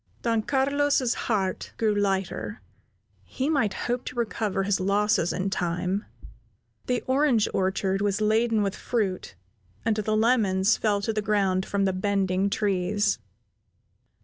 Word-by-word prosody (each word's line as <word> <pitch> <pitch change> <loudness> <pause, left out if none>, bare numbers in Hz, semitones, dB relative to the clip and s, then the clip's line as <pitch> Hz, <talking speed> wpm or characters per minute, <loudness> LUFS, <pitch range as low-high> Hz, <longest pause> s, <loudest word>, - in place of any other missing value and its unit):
Don 230 -2 +1
Carlos's 275 0 +1
heart 195 -5 -2
grew 220 -2 +2
lighter; 200 +1 -2 0.6
he 270 +4 -2
might 225 -10 +1
hope 245 +1 -1
to - - -6
recover 215 -4 -1
his 200 0 +1
losses 200 -1 +2
in 190 +1 -2
time. 180 +3 -1 0.8
The 250 -1 0
orange 260 -4 +3
orchard 190 +1 0
was 205 0 0
laden 220 0 +2
with 195 0 -2
fruit, 195 - -2 0.5
and 225 - +2
the 215 0 0
lemons 215 -3 +3
fell 205 -2 0
to 225 +2 -1
the 215 - -1
ground 195 -3 +1
from 200 -1 0
the 190 - +1
bending 195 0 0
trees. 200 0 0
205 Hz, 135 wpm, -26 LUFS, 190-225 Hz, 0.8 s, orange